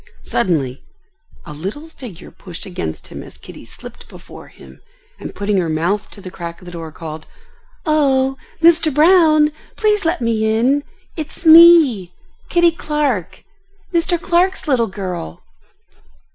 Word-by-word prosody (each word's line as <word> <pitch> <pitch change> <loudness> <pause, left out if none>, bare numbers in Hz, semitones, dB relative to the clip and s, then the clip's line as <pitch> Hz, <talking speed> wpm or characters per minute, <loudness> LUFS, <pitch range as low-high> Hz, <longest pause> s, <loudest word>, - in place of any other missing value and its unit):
Suddenly 145 - -1 0.6
a 150 - -9
little 195 - -7
figure 240 - -12
pushed 180 +1 -10
against 85 - -6
him - - -8
as - - -13
Kitty - - -13
slipped - - -12
before - - -13
him, 65 -1 -17 0.4
and - - -8
putting 205 0 -1
her 170 -3 -1
mouth 170 +6 -1
to 200 - -14
the 185 - -9
crack 170 -2 -8
of 180 - -16
the 175 - -9
door, 165 -2 -8
called, 155 -1 -9 0.6
"Oh! 270 -4 +2 0.3
Mr. 330 -1 +5
Brown, 310 0 +4 0.2
please 420 -1 +1
let 335 +2 0
me 220 -2 0
in. 270 +5 +1 0.3
It's 315 +2 -8
me, 315 - +7 0.3
Kitty 345 -1 +4
Clark, 300 - -3 0.5
Mr. 340 0 +1
Clark's 360 +2 0
little 250 -5 +2
girl." 185 -4 -6
235 Hz, 140 wpm, -18 LUFS, -, 0.6 s, me